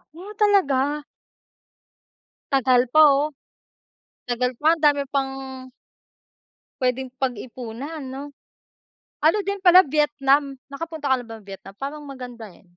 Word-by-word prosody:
Oh, 385 +5 -10
talaga? 295 -8 +2 1.5
Tagal 255 -2 +3
pa 310 - +6
oh. 280 +2 +2 1.0
Tagal 250 +1 -1
pa 305 +6 +3
ang 330 - -4
dami 290 -2 +3
pang 275 -1 +1 1.6
puwedeng 255 0 -1
pag-ipunan, 255 +3 -5
'no? 265 +2 -7 1.0
Ano 320 +7 +4
din 400 0 -3
pala, 365 0 +8
Vietnam, 280 -1 +1 0.2
nakapunta 315 -1 -5
ka - - +5
na 240 - -11
bang 225 -1 -10
Vietnam? 195 0 -11
Parang 290 +2 -6
maganda 250 -4 -9
eh. - - -21
275 Hz, 120 wpm, -23 LUFS, 250-300 Hz, 1.6 s, pala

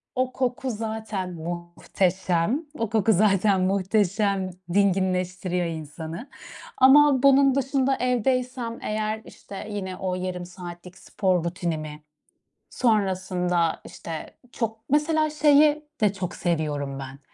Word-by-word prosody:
O 255 0 0
koku 255 0 -1
zaten 215 -4 -4
muhteşem. 175 - -1
O 225 -2 -1
koku 220 0 +3
zaten 195 0 +3
muhteşem. 195 0 +1 0.2
Dinginleştiriyor 185 -2 +1
insanı. 160 - -6 0.5
Ama 275 0 +6
bunun 275 -1 +6
dışında 270 0 +1
evdeysem 250 -1 -1
eğer, 215 0 -2
işte, 200 +1 -9
yine 190 -2 -4
o 185 -1 -2
yarım 180 -1 -4
saatlik 180 0 -10
spor 185 -4 0
rutinimi 155 -3 -4 0.7
sonrasında 185 -6 +1
işte 165 -1 -8
çok 225 -2 -3
Mesela 310 +2 +2
şeyi 300 0 +4 0.2
de 205 -2 +3
çok 185 -3 -5
seviyorum 145 -5 -2
ben. 135 +1 -8
195 Hz, 105 wpm, -25 LUFS, 175-245 Hz, 0.7 s, Ama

